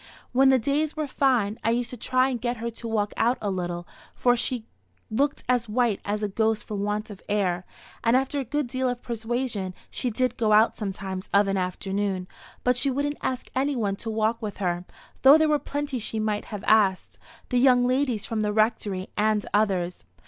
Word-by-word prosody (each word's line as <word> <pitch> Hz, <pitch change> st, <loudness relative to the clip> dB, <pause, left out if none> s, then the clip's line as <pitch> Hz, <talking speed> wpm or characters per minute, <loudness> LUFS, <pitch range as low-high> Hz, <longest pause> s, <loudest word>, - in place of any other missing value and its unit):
When 265 Hz, +2 st, +5 dB
the 265 Hz, -, +6 dB
days 290 Hz, +5 st, 0 dB
were 310 Hz, -, 0 dB
fine, 250 Hz, -6 st, +1 dB
I 225 Hz, -, +2 dB
used 240 Hz, +1 st, 0 dB
to -, -, -5 dB
try 255 Hz, +2 st, +1 dB
and 245 Hz, -4 st, -3 dB
get 240 Hz, 0 st, -1 dB
her 235 Hz, +1 st, -3 dB
to 230 Hz, +1 st, -8 dB
walk 210 Hz, -2 st, 0 dB
out 240 Hz, +3 st, +2 dB
a 205 Hz, -, -2 dB
little, 175 Hz, -2 st, -3 dB, 0.3 s
for 245 Hz, -1 st, +3 dB
she 240 Hz, -1 st, -1 dB, 0.5 s
looked 280 Hz, +6 st, 0 dB
as 245 Hz, -2 st, +1 dB
white 230 Hz, -2 st, +1 dB
as 210 Hz, +1 st, -2 dB
a -, -, +2 dB
ghost 220 Hz, +2 st, 0 dB
for 215 Hz, -, -8 dB
want 210 Hz, +1 st, -2 dB
of 195 Hz, -, -10 dB
air; 185 Hz, -4 st, 0 dB, 0.4 s
and 230 Hz, +2 st, +4 dB
after 270 Hz, +2 st, -1 dB
a -, -, -1 dB
good 290 Hz, +4 st, -1 dB
deal 255 Hz, +1 st, -1 dB
of 245 Hz, 0 st, -4 dB
persuasion, 225 Hz, -4 st, -3 dB, 0.2 s
she 250 Hz, -, -2 dB
did 250 Hz, +2 st, 0 dB
go 220 Hz, -3 st, +2 dB
out 215 Hz, +2 st, +5 dB
sometimes 195 Hz, -2 st, -5 dB
of 200 Hz, 0 st, +4 dB
an 195 Hz, -, 0 dB
afternoon, 190 Hz, 0 st, -2 dB, 0.4 s
but 250 Hz, 0 st, +3 dB
she 275 Hz, -, +2 dB
wouldn't 285 Hz, +2 st, -1 dB
ask 255 Hz, -1 st, -3 dB
any 275 Hz, +2 st, +1 dB
one 205 Hz, -5 st, 0 dB
to 225 Hz, -, -5 dB
walk 220 Hz, +1 st, 0 dB
with 210 Hz, -2 st, -5 dB
her, 180 Hz, -2 st, -1 dB, 0.4 s
though 275 Hz, +3 st, +9 dB
there 315 Hz, 0 st, +3 dB
were 300 Hz, -1 st, +3 dB
plenty 285 Hz, -3 st, -3 dB
she 220 Hz, 0 st, -3 dB
might 215 Hz, -1 st, -1 dB
have 210 Hz, -2 st, -7 dB
asked 200 Hz, -4 st, +3 dB, 0.3 s
the 250 Hz, -, +2 dB
young 250 Hz, -1 st, +5 dB
ladies 250 Hz, -4 st, +1 dB
from 225 Hz, -2 st, -2 dB
the 210 Hz, -1 st, 0 dB
Rectory 210 Hz, -3 st, 0 dB
and 215 Hz, 0 st, +1 dB
others. 185 Hz, -, +1 dB
225 Hz, 205 wpm, -26 LUFS, 205-255 Hz, 0.5 s, though